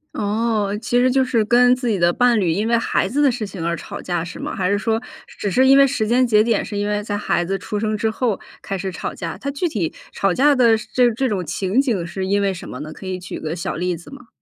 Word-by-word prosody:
哦， 210 Hz, -1 st, 0 dB
其 240 Hz, +1 st, 0 dB
实 255 Hz, +1 st, +4 dB
就 265 Hz, 0 st, +3 dB
是 235 Hz, -3 st, +1 dB
跟 245 Hz, +3 st, +5 dB
自 250 Hz, -2 st, -2 dB
己 200 Hz, -4 st, 0 dB
的 170 Hz, 0 st, +3 dB
伴 245 Hz, -3 st, +3 dB
侣 180 Hz, -4 st, +1 dB
因 200 Hz, +6 st, 0 dB
为 235 Hz, -, +4 dB
孩 230 Hz, -, 0 dB
子 280 Hz, +8 st, 0 dB
的 285 Hz, -, +5 dB
事 235 Hz, -4 st, -2 dB
情 185 Hz, -4 st, -6 dB
而 170 Hz, 0 st, 0 dB
吵 -, -, -8 dB
架 175 Hz, -2 st, -2 dB
是 175 Hz, -, -8 dB
吗？ -, -, -4 dB
还 180 Hz, -2 st, 0 dB
是 205 Hz, -, +2 dB
说 225 Hz, +1 st, 0 dB, 0.3 s
只 205 Hz, -, -4 dB
是 260 Hz, +7 st, +4 dB
因 270 Hz, +1 st, +7 dB
为 275 Hz, -, +7 dB
时 250 Hz, -5 st, -1 dB
间 250 Hz, +3 st, +3 dB
节 215 Hz, -3 st, +4 dB
点 225 Hz, -2 st, +1 dB
是 205 Hz, -, -5 dB
因 205 Hz, -, -1 dB
为 210 Hz, 0 st, -1 dB
在 205 Hz, -1 st, -3 dB
孩 175 Hz, -, 0 dB
子 195 Hz, +3 st, -2 dB
出 210 Hz, -, -4 dB
生 215 Hz, 0 st, -1 dB
之 220 Hz, +1 st, 0 dB
后 225 Hz, -2 st, -1 dB, 0.2 s
开 195 Hz, -, -4 dB
始 190 Hz, +1 st, -3 dB
吵 -, -, -4 dB
架， 165 Hz, +1 st, -5 dB
它 275 Hz, +8 st, -4 dB
具 290 Hz, +6 st, -1 dB
体 200 Hz, -, -2 dB, 0.2 s
吵 195 Hz, -2 st, +1 dB
架 285 Hz, +7 st, +4 dB
的 235 Hz, -4 st, +5 dB, 0.2 s
这 245 Hz, -2 st, +4 dB
这 260 Hz, +4 st, -1 dB
种 190 Hz, -6 st, -2 dB
情 190 Hz, -, 0 dB
景 210 Hz, -11 st, -1 dB
是 190 Hz, +2 st, -4 dB
因 200 Hz, +1 st, +2 dB
为 195 Hz, -1 st, +1 dB
什 175 Hz, -, -9 dB
么 125 Hz, -, -7 dB
呢？ 155 Hz, +1 st, -7 dB
可 -, -, -11 dB
以 185 Hz, -1 st, -3 dB
举 185 Hz, -, -7 dB
个 155 Hz, 0 st, -3 dB
小 170 Hz, -, -3 dB
例 180 Hz, +1 st, -1 dB
子 170 Hz, -, -14 dB
吗？ 260 Hz, -4 st, -12 dB
210 Hz, 305 characters per minute, -20 LUFS, 185-245 Hz, 0.3 s, 因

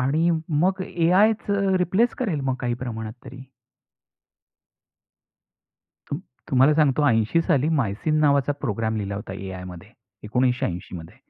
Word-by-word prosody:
आणि 155 Hz, +7 st, +2 dB, 0.3 s
मग 185 Hz, +1 st, +1 dB
एआयच 185 Hz, +6 st, +2 dB, 0.3 s
रिप्लेस 190 Hz, +7 st, +1 dB
करेल 190 Hz, -, -1 dB
मग 135 Hz, -1 st, -1 dB
काही 120 Hz, -1 st, -1 dB
प्रमाणात 110 Hz, -2 st, -5 dB
तरी. 130 Hz, 0 st, -10 dB, 2.7 s
तुम 145 Hz, -, -3 dB, 0.3 s
तुम्हाला 135 Hz, +3 st, +5 dB
सांगतो 150 Hz, -1 st, +3 dB
80 115 Hz, +7 st, +2 dB
साली 155 Hz, -4 st, +1 dB
MYCIN 135 Hz, +7 st, 0 dB
नावाचा 140 Hz, -1 st, +3 dB
प्रोग्राम 110 Hz, -3 st, -2 dB
लिहिला 100 Hz, -1 st, -3 dB
होता 100 Hz, -1 st, -6 dB
एआयमध्ये, 90 Hz, -3 st, -8 dB, 0.3 s
1980 115 Hz, -7 st, -1 dB
मध्ये 80 Hz, -1 st, -11 dB
130 Hz, 115 wpm, -23 LUFS, 110-160 Hz, 2.7 s, तुम्हाला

